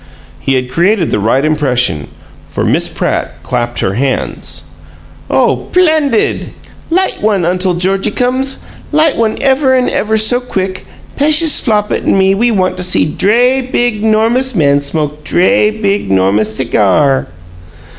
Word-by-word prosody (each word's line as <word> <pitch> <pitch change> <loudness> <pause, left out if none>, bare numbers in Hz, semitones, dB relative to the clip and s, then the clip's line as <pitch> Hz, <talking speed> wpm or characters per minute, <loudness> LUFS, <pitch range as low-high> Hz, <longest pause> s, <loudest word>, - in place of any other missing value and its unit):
He 135 - -1
had 125 -1 -2
created 175 +4 +1
the - - 0
right 120 +7 +1
impression, 125 - 0 0.4
for - - -3
Miss - - +1
Pratt - - -3
clapped 120 -1 -2
her 95 - -1
hands. 130 +5 -2 0.7
"Oh, - - +1
'plendid! 310 -9 +1 0.4
Light 370 +3 0
one, 205 -4 +1
Untle 180 +1 0
Georgiecums! 225 +9 0 0.3
Light 310 0 +2
one 225 -1 -1
ever 265 -1 +2
'n' 255 -1 +1
ever 220 +1 -1
so 220 +3 +3
quick! 190 -6 -5 0.3
P'eshus 305 +2 +4
Flopit 210 -3 -1
an' - - +1
me 190 0 +3
we 235 +5 +1
want 185 -4 -1
see 180 - +2
dray, 240 - +1
big, 240 -4 -2
'normous 230 +4 +1
man 140 -4 +2
smoke 150 +1 -3
dray, 185 - +2
big, 205 - -2
'normous 100 +3 +1
cigar!" 130 +9 +1
195 Hz, 135 wpm, -12 LUFS, -, 0.7 s, P'eshus